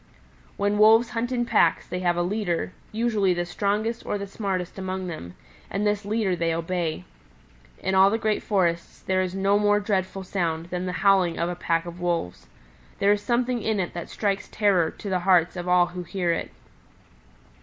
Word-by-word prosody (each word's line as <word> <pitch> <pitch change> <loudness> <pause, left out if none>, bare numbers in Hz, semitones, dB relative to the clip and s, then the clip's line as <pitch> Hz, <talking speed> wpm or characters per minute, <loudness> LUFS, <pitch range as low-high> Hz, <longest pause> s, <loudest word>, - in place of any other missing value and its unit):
"When 205 +1 +1
Wolves 225 +2 +6
hunt 240 +2 -2
in 240 -1 0
packs 170 -7 +3
they 180 - -4
have 175 -1 +1
a 175 - +2
leader, 185 -2 -2 0.2
usually 215 -5 +1
the 175 0 -1
strongest 210 +5 -1
or - - -2
the 200 - -5
smartest 195 -3 -4
among 185 0 -3
them, 125 - -7 0.3
and 200 +2 -1
this 210 -1 0
leader 205 -3 0
they 165 -1 0
obey. 165 - -2 0.7
In 190 - -2
all 190 +1 +6
the 220 - 0
great 215 -1 0
forests 175 -5 -1
there 185 0 +1
is 185 0 -3
no 195 +1 +2
more 205 0 +3
dreadful 195 -2 -2
sound 170 -3 -2
than 180 0 -2
the - - -1
howling 190 -4 +4
of 170 +1 0
a 175 - -3
pack 165 -1 0
of 175 0 -8
wolves. 170 - -2 0.5
There 200 - +3
is 205 - -2
something 240 +2 0
in 220 -1 0
it 180 - -2
that 175 - -6
strikes 200 -2 -1
terror 195 -6 +2
to - - -10
the 185 -2 0
hearts 180 -2 +3
of 175 0 -5
all 180 0 +5
who 180 +1 -7
hear 175 -1 -1
it. - - -3
190 Hz, 195 wpm, -25 LUFS, 175-205 Hz, 0.7 s, Wolves